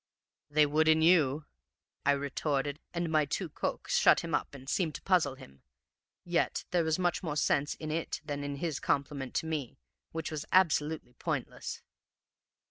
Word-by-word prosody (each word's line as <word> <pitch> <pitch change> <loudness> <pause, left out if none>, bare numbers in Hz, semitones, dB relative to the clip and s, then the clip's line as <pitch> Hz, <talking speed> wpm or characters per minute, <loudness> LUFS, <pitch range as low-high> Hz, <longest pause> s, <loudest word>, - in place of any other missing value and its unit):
"'They 150 +1 +5
would 155 +2 +2
in 160 0 +6
you,' 155 -4 +4 0.6
I 140 - +6
retorted, 140 +1 -1
and 170 -2 -2
my 155 -1 +3
tu 165 +5 -3
quoque - - -3
shut - - +5
him - - -5
up - - -1
and 135 -1 -11
seemed 160 0 0
to - - -6
puzzle 170 -8 +2
him. 70 - -15 0.6
Yet 175 -1 0
there 175 -2 +3
was 160 -1 +1
much 180 -1 0
more 155 -5 -3
sense 145 0 +1
in 155 -1 -5
it 165 +1 -2
than 145 -2 -3
in 145 0 -3
his 155 0 -2
compliment 140 -2 -1
to - - 0
me, 155 -6 -3 0.3
which 160 0 -4
was 155 -2 -3
absolutely 155 -7 +2
pointless. - - -4
150 Hz, 170 wpm, -31 LUFS, 140-160 Hz, 0.6 s, in